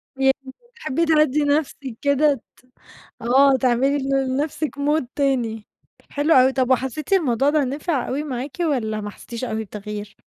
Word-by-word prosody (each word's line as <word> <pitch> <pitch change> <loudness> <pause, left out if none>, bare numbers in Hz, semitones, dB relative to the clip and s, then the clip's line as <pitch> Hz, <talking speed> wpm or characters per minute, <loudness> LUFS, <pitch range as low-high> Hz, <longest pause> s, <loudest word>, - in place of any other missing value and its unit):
يعني 270 0 0 0.2
بتحبّي 335 - -1
تهدّي 305 -2 +3
نَفْسِك 285 -4 -1
كده، 280 -2 +2 0.2
ت 255 - -26 0.6
آه، 265 +3 +5
تعملي 260 +3 +2
ل 270 0 0
لنَفْسِك 300 +1 -2
mood 295 0 +1
تاني. 240 -6 -1 0.4
حلو 295 +3 +2
أوي. 260 +1 +5
طَب 260 0 0
وحسّيتِ 265 +7 -1
الموضوع 280 -7 +3
ده 300 -1 +2
نِفِع 280 +1 -2
أوي 275 +3 -2
معاكِ 265 -1 -5
والّا 240 -10 0
ما 205 0 -5
حسّتيش 235 +4 -7
أوي 220 -2 -3
بتغيير؟ 210 0 -7
270 Hz, 150 wpm, -22 LUFS, 245-290 Hz, 0.6 s, آه